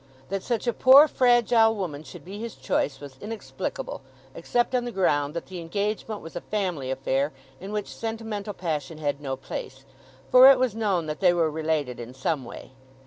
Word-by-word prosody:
That 195 0 -2
such 235 +1 -2
a 240 - +1
poor 270 +6 +8
fragile 240 -4 +4
woman 170 -8 -4
should 160 - -12
be 200 +3 -8
his 230 0 -6
choice 135 +1 -1
was 140 -2 -11
inexplicable, 365 - -5 0.3
except 240 +1 -1
on 250 -1 +1
the 240 - -4
ground 150 -7 +1
that 170 - -4
the 185 -1 -8
engagement 205 +5 -3
was 165 - -11
a 175 - -4
family 180 -11 -2
affair 135 +2 0 0.3
in 195 +3 -8
which 210 -1 -4
sentimental 220 -3 -5
passion 155 -3 -3
had 145 -2 -2
no 135 -2 -3
place; 135 0 -8 0.5
for 255 +1 +10
it 275 - +7
was 255 -4 +1
known 200 -7 0
that 155 0 -4
they 180 -3 +4
were 165 -3 +1
related 155 -6 -2
in 120 +2 -8
some 135 0 -2
way. 120 - -10
185 Hz, 190 wpm, -26 LUFS, 145-225 Hz, 0.5 s, for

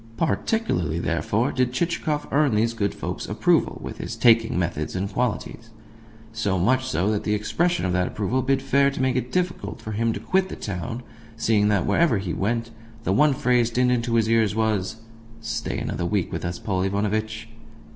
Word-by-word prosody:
Particularly, 100 - 0
therefore, 85 - 0
did 125 -1 0
Chichikov 155 -1 -1
earn 145 -5 +3
these 115 +2 +2
good 100 -3 -1
folk's - - -5
approval - - +2
with - - -7
his - - -5
taking 115 -3 +4
methods 85 -3 -2
and 95 +2 -1
qualities 115 -1 -2 0.6
so 105 -4 0
much 130 +9 +2
so 105 -4 +1
that 105 - -1
the 105 - +1
expression 170 - 0
of 90 - 0
that 90 0 +1
approval 110 +5 -1
bid 135 +1 +1
fair 140 0 +3
to 140 - -6
make 130 -1 +1
it 125 -1 -2
difficult 175 - -2
for 110 - -7
him 115 +2 +1
to - - -5
quit 190 0 +1
the - - -5
town, 115 +6 -5 0.3
seeing 110 -2 +2
that, 100 -4 +2
wherever 165 -10 +3
he 95 -3 -3
went, 115 +3 -1 0.3
the 95 - +1
one 145 +6 +4
phrase 125 -2 +2
dinned 125 +1 +2
into 120 -1 0
his 115 -1 +3
ears 110 -2 +2
was 110 -4 0 0.4
"Stay 115 0 -3
another 85 - -2
week 100 -1 -1
with 80 +1 -4
us, 85 0 -3
Paul 95 -1 -2
Ivanovitch." 110 +3 -1
115 Hz, 185 wpm, -24 LUFS, 100-125 Hz, 0.6 s, taking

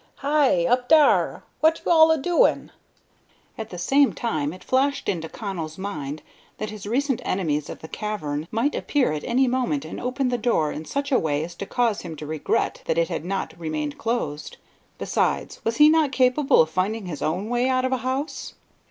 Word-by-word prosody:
"Hi! 280 - +2
up 245 +3 +1
dar. 310 -2 +4 0.2
What 320 +1 +3
you - - +1
all 320 -1 +7
a 320 - +4
doin'?" 350 - +2 0.8
At 220 -1 -6
the 180 - -8
same 270 +10 +3
time 155 -11 -2
it 185 - -11
flashed 275 +2 0
into 160 -3 -2
Connell's 170 -7 -6
mind 155 -7 -5 0.3
that 215 0 -4
his 210 -2 -8
recent 265 +3 0
enemies 150 -6 -1
of - - -8
the 160 - -8
cavern 160 -8 -4
might 235 +7 0
appear 280 - 0
at 150 - -4
any 255 +2 +2
moment 255 +3 -1
and - - -7
open 250 +1 -1
the 245 -1 -1
door 185 -11 +1
in 155 - -6
such 280 - -3
a 255 - +4
way 150 -1 -1
as 170 +2 -7
to 195 +3 -7
cause 235 -4 0
him 165 -2 -7
to 150 - -8
regret 155 - -1
that - - 0
it - - +2
had - - -3
not 195 +2 -3
remained 155 -3 -4
closed. 225 -11 -3 0.4
Besides, - - -1
was 225 0 -1
he 300 - +8
not 310 -2 +3
capable 255 - +4
of 160 - -8
finding 195 +5 -1
his 165 -5 -6
own 180 +7 -1
way 245 +2 +1
out 255 0 +1
of 260 - -1
a 260 - +2
house? 260 +5 -4
230 Hz, 200 wpm, -24 LUFS, 165-270 Hz, 0.8 s, he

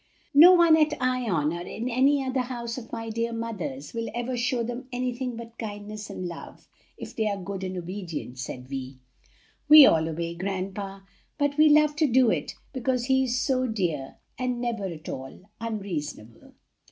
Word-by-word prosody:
"No 330 +6 +9
one 340 -3 +6
at 305 -1 +2
Ion 230 - 0
or 170 - -5
in 220 +7 -5
any 270 +3 +3
house 245 -2 -2
of 230 - -13
my 225 -1 -5
dear 230 +1 -1
mother's 200 - -5
will 230 0 -3
ever 240 +1 -2
show 245 0 0
them 245 +3 -5
anything 250 0 -3
but 230 0 -10
kindness 210 -1 -6
and 180 - -5
love 170 -1 -10 0.3
if - - -9
they 220 -1 0
are 200 -1 -1
good 195 0 -5
and 185 0 -4
obedient," 170 -8 -6
said 125 0 -6
Vi. 135 -1 -6 0.7
"We 305 -2 +11
all 160 -7 +3
obey 170 +1 -3
grandpa, 195 +2 -4 0.4
but 285 -1 +1
we 305 +1 +6
love 300 0 +5
to 310 - +3
do 250 -2 +4
it, - - -2 0.2
because 255 -2 -1
he 265 0 +3
is 245 0 0
so 255 -1 +1
dear 170 - -2 0.2
and 250 -1 -1
never 235 -4 -2
at 165 -4 -7
all 135 0 -7 0.2
unreasonable." 175 - -6
230 Hz, 175 wpm, -26 LUFS, 180-255 Hz, 0.7 s, We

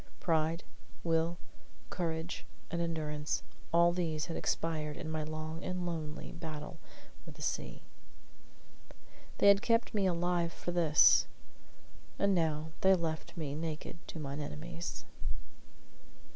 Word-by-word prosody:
Pride, 165 0 +2 0.4
will, 165 +1 +2 0.5
courage, 165 -1 -2 0.3
and 170 0 0
endurance, 155 -3 -1 0.3
all 170 +1 +6
these 160 -4 0
had 165 - -4
expired 155 -2 -1
in 155 - -4
my 155 -1 -1
long 155 +2 -4
and 180 -1 -2
lonely 155 -3 -4
battle 160 0 -6 0.4
with - - -11
the - - -12
sea. - - -2 1.5
They - - +5
had 200 0 +7
kept 230 0 +2
me 200 -3 +3
alive 175 -1 +1
for 175 - -4
this. 165 -4 +6 0.9
And 200 0 +3
now 160 -2 +1
they 190 0 +7
left 165 -1 -3
me 150 -4 -2
naked 160 +2 -4
to - - -6
mine 140 -1 -4
enemies. 165 +4 -5
165 Hz, 125 wpm, -34 LUFS, 155-175 Hz, 1.5 s, had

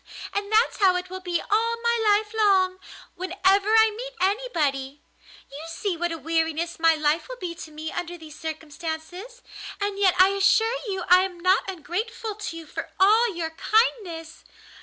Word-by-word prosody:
And 405 +1 -3
that's 445 +3 +3
how 380 -3 +4
it 360 0 -4
will 375 - -5
be 355 -2 -2
all 460 +2 +1
my 470 0 +2
life 425 0 +2
long, 380 -4 +3 0.3
whenever 380 +2 +1
I 445 -1 +5
meet - - -7
anybody. 300 - -1 0.5
You 280 +2 -8
see 350 +3 -3
what 345 +1 -2
a 330 - -4
weariness 325 +1 -1
my 325 0 +5
life 310 +6 0
will - - -7
be 360 -6 -5
to 330 -1 -10
me 310 +1 -6
under 350 0 -5
these 315 -2 -12
circumstances, 320 +8 -7 0.4
and 405 -1 -2
yet 380 -3 +4
I 370 +1 +7
assure 395 +4 +3
you 385 -2 -3
I 360 +1 +7
am 370 -2 -4
not 370 +2 +2
ungrateful 410 +6 -4
to 410 -5 -6
you 330 - -9
for - - -7
all 435 +4 +5
your 325 -1 -3
kindness!" 345 -5 0
370 Hz, 175 wpm, -25 LUFS, 330-420 Hz, 0.5 s, I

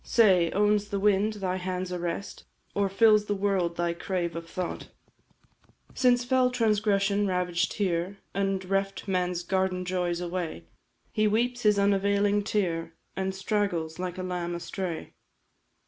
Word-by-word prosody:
Say, 185 -7 +4
owns 205 +1 +2
the 200 -1 -2
wind 205 +1 +3
thy 190 -3 -2
hand's 185 0 -3
arrest, 175 +2 -4 0.3
Or 200 -1 +1
fills 210 +1 +5
the 205 - -1
world 190 -4 0
thy 175 0 0
crave 170 -1 -3
of 165 0 -6
thought? 180 0 -4 1.1
"Since 245 -1 +3
fell 255 0 +3
transgression 205 -4 +2
ravaged 180 -1 0
here 185 -1 -1 0.2
And 195 -1 -1
reft 195 +1 -1
Man's 180 -2 0
garden 185 0 0
joys 180 -1 -1
away, 175 - -4 0.5
He 215 0 +2
weeps 245 +3 +1
his 210 -2 +4
unavailing 200 +1 +2
tear, 165 -6 -1 0.2
And 190 0 -2
straggles, 190 -5 -1
like 180 0 -4
a 185 - -4
lamb 175 -1 -3
astray. 170 0 -5
190 Hz, 140 wpm, -28 LUFS, 180-205 Hz, 1.1 s, fills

